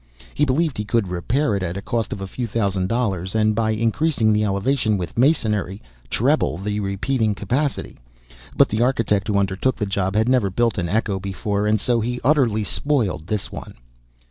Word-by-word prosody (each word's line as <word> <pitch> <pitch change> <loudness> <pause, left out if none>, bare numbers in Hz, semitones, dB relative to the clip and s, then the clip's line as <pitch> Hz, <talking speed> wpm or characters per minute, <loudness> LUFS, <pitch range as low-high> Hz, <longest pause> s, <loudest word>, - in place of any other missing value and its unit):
He 150 - +2
believed 145 -1 0
he - - 0
could 105 -2 0
repair 105 - 0
it 100 - -2
at 90 0 -3
a - - -4
cost 115 +1 -2
of 100 - -5
a - - -3
few 120 +5 -4
thousand 100 -4 -1
dollars, 100 -6 -1
and, 110 0 +3
by 110 0 0
increasing 115 +2 +1
the 105 0 +2
elevation 105 +2 +1
with 90 -3 -5
masonry, 105 - +1 0.3
treble - - +1
the 105 +2 -3
repeating 105 +3 0
capacity; 135 +7 -2 0.6
but - - +6
the 110 +2 -1
architect 110 -5 +1
who 105 -2 +1
undertook 100 +6 0
the 105 - -2
job 100 -1 -1
had 110 +2 +2
never 125 -6 +3
built 115 +2 0
an 85 -2 -2
echo 105 -1 0
before, 100 +2 -2
and 110 0 +2
so 120 +2 +1
he 120 +2 -2
utterly 125 -7 +3
spoiled 105 - -1
this 105 -1 -3
one. - - -8
105 Hz, 190 wpm, -22 LUFS, 100-120 Hz, 0.6 s, but